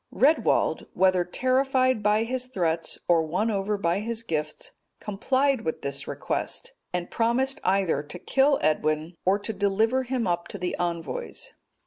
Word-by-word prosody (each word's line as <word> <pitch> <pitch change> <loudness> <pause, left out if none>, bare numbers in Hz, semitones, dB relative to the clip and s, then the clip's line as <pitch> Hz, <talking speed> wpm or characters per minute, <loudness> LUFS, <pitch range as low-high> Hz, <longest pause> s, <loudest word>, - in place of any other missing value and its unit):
Redwald, 295 +6 +2
whether 185 -1 +4
terrified 255 +4 +2
by 210 +1 +3
his 255 +2 -3
threats, 170 -8 -1
or 170 -2 +5
won 180 +8 0
over 205 +1 -1
by 175 -1 +1
his 230 +1 -3
gifts, 165 - -3 0.3
complied 260 +6 +1
with 160 - -4
this 140 0 -3
request, - - -3 0.2
and 180 -1 -3
promised 250 +4 +1
either 185 -6 +2
to 150 +4 -8
kill 270 +9 +3
Edwin, 155 +2 +1
or 190 +2 +4
to 210 +2 -3
deliver 215 +5 +2
him 255 -2 -2
up 175 -1 -1
to - - -6
the 180 -1 -2
envoys. 170 -6 -3
200 Hz, 150 wpm, -26 LUFS, 175-255 Hz, 0.3 s, or